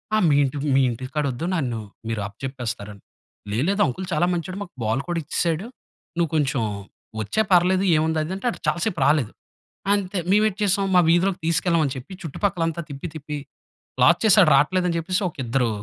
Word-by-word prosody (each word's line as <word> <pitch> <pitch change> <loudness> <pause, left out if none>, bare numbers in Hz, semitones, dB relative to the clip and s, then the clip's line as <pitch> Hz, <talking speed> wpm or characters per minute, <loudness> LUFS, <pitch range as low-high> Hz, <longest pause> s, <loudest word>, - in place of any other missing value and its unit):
ఆహ్, 215 - +3
మీ 145 - +4
ఇంటి 140 +1 -2 0.2
మీ 135 - +5
ఇంటికాడ, 130 +6 -3
వద్దు. 125 +6 -5
నన్ను 125 -9 -1 0.3
మీరు 110 -2 -2
అప్పచెప్పేస్తారని. 105 -3 -6 0.5
"లేదు, 115 +5 0
లేదు, 200 +1 +1
అంకుల్ 155 +7 -3
చాలా 155 +3 +2
మంచోడు. 180 +3 -4
మాకు 175 - -14
బాల్ 110 +5 0
కూడా 175 -1 -1
ఇచ్చేసాడు. 165 +5 -1 0.5
నువ్వు 170 -2 +1
కొంచెం, 140 -4 +1 0.6
వచ్చేయ్ 215 - 0
పర్లేదు, 185 +2 +4
ఏముంది? 160 +1 +1
"అది 165 +4 -4
అంటే, 195 +6 -3 0.2
చాలా 175 - +1
సేపు 180 -7 -2
రాలేదు. 145 -7 +2 0.6
అంతే! 195 -1 -1
మేము 210 +3 +4
ఏటి 200 - -11
చేసాం, 195 0 +2
మా - - +7
వీధిలోకి 175 +2 +2
తీసుకెళ్ళమని 165 -3 +1
చెప్పి, 130 +9 -9
చుట్టుపక్కల 170 +2 -1
అంతా 165 +1 -5
తిప్పి, 140 +4 -6
తిప్పి, 150 -1 -5 0.7
లాక్ - - +6
చేసాడు, 205 -5 +6
రాట్లేదు 180 +6 +2
అని 170 - -1
చెప్పేసి, 185 +4 -1
ఒక - - -19
ఇద్దరు 120 0 +1
160 Hz, 180 wpm, -23 LUFS, 135-185 Hz, 0.7 s, మా